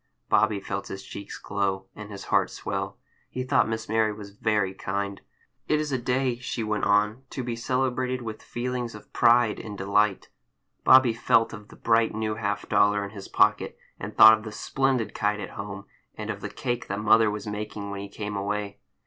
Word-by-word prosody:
Bobby 110 -2 +3
felt 100 0 -4
his 95 0 -7
cheeks 100 0 -8
glow, 95 -1 -2
and 105 0 -9
his 100 -1 -8
heart - - +2
swell. - - -4 0.3
He 130 - -4
thought 130 - +2
Miss 110 0 -3
Mary 110 0 +2
was 105 -1 -9
very 105 -1 0
kind. 100 +1 -3 0.5
"It 150 - +2
is 150 -1 -2
a 130 - 0
day," 125 0 0
she 120 -2 -3
went 105 -1 -1
on, 105 +4 +2
"to 130 - -4
be 120 -1 -3
celebrated 125 +1 -1
with 110 -1 -6
feelings 120 -1 -4
of 105 - -14
pride 120 -2 +4
and 105 -2 -7
delight." 100 +1 +1 0.5
Bobby 130 -3 +7
felt 115 -1 +2
of 105 -1 -9
the - - -15
bright 115 -1 +2
new 110 0 -1
half 105 -1 -3
dollar 105 0 +3
in 100 - -6
his 100 -2 -9
pocket, - - +2 0.2
and - - -7
thought 110 0 +11
of - - -12
the 110 - -6
splendid 130 +1 0
kite 105 0 0
at 105 - -6
home, 100 -1 -7 0.3
and - - -4
of - - -7
the - - -4
cake 120 -1 -3
that 100 +1 -3
mother 110 +1 +5
was 105 -1 -4
making 105 -1 -5
when 100 - -5
he 100 - -7
came 105 0 -5
away. 100 0 -3
105 Hz, 200 wpm, -26 LUFS, 100-120 Hz, 0.5 s, thought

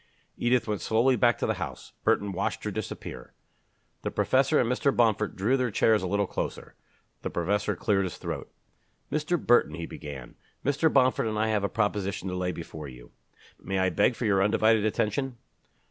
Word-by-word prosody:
Edith 120 0 +1
went 105 -4 -2
slowly 120 +6 +3
back 120 -2 +3
to - - -1
the - - +1
house. - - -6
Burton 100 0 +2
watched 95 +1 -2
her - - -2
disappear. 65 - -6 0.7
The - - -2
professor 135 +3 +2
and 120 - +2
Mr. 125 +3 +2
Bomford 110 -3 +2
drew 110 +8 +2
their 125 -1 0
chairs 110 0 +3
a 95 - -2
little 100 +2 +1
closer. - - -5 0.5
The - - -3
professor 100 +4 0
cleared 100 0 +1
his 90 - -5
throat. - - -5 0.6
"Mr. 155 +3 0
Burton," 120 - +3
he 85 0 -5
began, 70 -6 -8 0.3
"Mr. 145 +3 +2
Bomford 130 -3 +3
and 110 -1 -2
I 110 +1 +1
have 105 -2 +1
a 100 - 0
proposition 100 -3 -1
to 90 - -3
lay 90 0 -1
before 80 -3 -8
you. 60 -2 -13 0.5
May 95 - -2
I 95 0 +2
beg 115 +8 +2
for 120 - -3
your 100 -2 +3
undivided 110 +1 +3
attention?" 120 +4 -1
105 Hz, 185 wpm, -27 LUFS, 95-120 Hz, 0.7 s, slowly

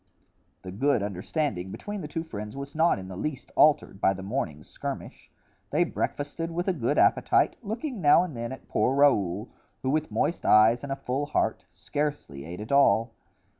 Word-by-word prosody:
The 95 - -7
good 120 +2 +1
understanding 100 - -2
between 205 - -6
the 150 - -5
two 165 +2 -4
friends 105 -5 -7
was 140 0 -6
not 160 -2 +3
in 95 -1 -8
the 95 - -8
least 140 +7 -5
altered 150 -9 +3
by 95 - +3
the 95 - -8
morning's 95 - -4
skirmish. - - -7 0.4
They 155 +4 +3
breakfasted 165 -1 -3
with 175 +2 -3
a 190 - +2
good 145 -2 -1
appetite, - - +3
looking 235 +2 -4
now 150 +3 +6
and 170 -7 -6
then 115 +1 -4
at 130 - -9
poor 130 - +1
Raoul, 105 -8 +2 0.3
who 130 - +1
with 155 +1 0
moist 170 - -1
eyes 110 +3 +5
and 140 - -6
a - - 0
full 135 +2 -3
heart, 115 -6 -1
scarcely 95 - -4
ate 90 +5 -7
at 110 - -7
all. 115 -4 +4
135 Hz, 185 wpm, -27 LUFS, 100-155 Hz, 0.4 s, now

